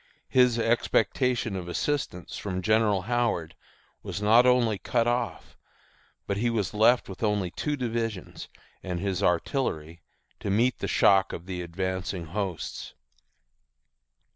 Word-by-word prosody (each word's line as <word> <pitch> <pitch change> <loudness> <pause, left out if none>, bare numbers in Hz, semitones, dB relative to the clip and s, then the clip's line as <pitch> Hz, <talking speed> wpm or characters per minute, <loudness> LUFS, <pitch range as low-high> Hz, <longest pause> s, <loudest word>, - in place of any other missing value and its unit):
His 125 -2 +4
expectation 115 0 +1
of 90 -2 -5
assistance 90 -1 -2
from 95 -2 -4
General 110 -3 +2
Howard 115 -8 -1 0.5
was - - -5
not 115 +4 +5
only 120 -5 +3
cut 115 +5 0
off, 120 -3 -2 0.7
but 100 - -2
he 120 +3 +1
was 110 -5 -1
left 115 +4 +4
with 95 - -9
only 105 -5 0
two 150 - -2
divisions 115 -6 -4 0.3
and 90 -2 -4
his 95 -1 -2
artillery 85 - -1 0.4
to - - -4
meet 115 +6 +2
the - - -2
shock 95 0 +4
of 85 - -7
the 90 -2 -4
advancing 95 +1 -3
hosts. 95 0 -5
105 Hz, 130 wpm, -27 LUFS, 95-120 Hz, 0.7 s, not